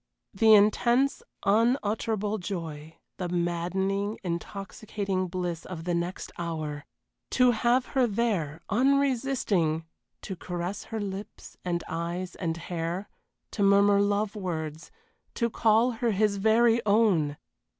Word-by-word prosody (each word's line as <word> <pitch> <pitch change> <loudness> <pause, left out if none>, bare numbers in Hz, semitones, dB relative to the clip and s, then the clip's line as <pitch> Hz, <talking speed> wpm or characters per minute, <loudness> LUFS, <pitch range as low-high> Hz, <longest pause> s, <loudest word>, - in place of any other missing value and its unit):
The 220 +2 +6
intense, 235 +6 +3 0.2
unutterable 215 -1 +1
joy 160 -5 -6 0.2
the 180 -2 -3
maddening, 185 +4 -1
intoxicating 195 +2 -3
bliss 175 -2 -3
of 170 -3 -7
the 175 +1 -1
next 170 +2 -3
hour! 155 -4 -4 0.4
To 250 -1 +4
have 240 +3 +2
her 260 -3 +1
there, 195 -9 -1
unresisting 250 - +1 0.4
to 190 - -5
caress 180 +3 -5
her 225 - -4
lips 200 0 -7
and 175 -1 -1
eyes 175 +2 -3
and 165 -3 -3
hair 170 +3 -4 0.4
to - - -4
murmur 200 0 +5
love 205 +1 0
words 160 -5 -4 0.5
to 235 -2 0
call 225 +3 +3
her 235 0 -1
his 200 0 +2
very 225 +3 +4
own! 200 -9 +3
195 Hz, 120 wpm, -28 LUFS, 170-220 Hz, 0.5 s, The